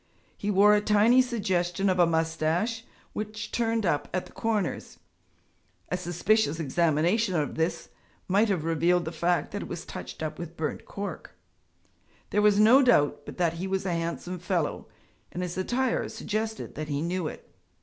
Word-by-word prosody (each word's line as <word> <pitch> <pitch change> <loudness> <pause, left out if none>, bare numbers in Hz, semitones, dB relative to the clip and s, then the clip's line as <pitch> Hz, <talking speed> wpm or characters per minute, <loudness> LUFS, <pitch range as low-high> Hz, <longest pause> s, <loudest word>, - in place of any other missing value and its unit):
He 205 - -4
wore 205 +1 +6
a 210 - +4
tiny 215 +4 +5
suggestion 195 -6 0
of 185 -1 +1
a 175 - +6
moustache 165 +7 0 0.3
which 215 0 -5
turned 225 -2 0
up 145 -4 0
at 185 - -1
the - - -15
corners 220 -3 -2 0.9
(a - - 0
suspicious 180 0 +1
examination 170 - +1
of 150 -3 0
this, 160 +2 -2 0.4
might 205 +4 +3
have 180 -6 0
revealed 170 +2 +2
the 160 - -3
fact 175 -2 0
that - - -4
it - - -6
was - - -6
touched - - -7
up 155 - -4
with 170 0 -7
burnt 155 - -3
cork); 200 - -7 1.0
there 210 - +2
was 210 -1 +4
no 230 +6 +7
doubt 145 - +3
but - - -8
that 170 -2 +1
he 190 - -2
was 190 0 -1
a 180 - 0
handsome 170 +2 -3
fellow, 175 -3 -2 0.4
and 180 - -4
his 175 -1 -4
attire 240 +7 0
suggested 220 +1 -4
that 155 0 -5
he 145 0 -2
knew 175 -1 -1
it. - - -10
180 Hz, 170 wpm, -27 LUFS, 165-210 Hz, 1.0 s, no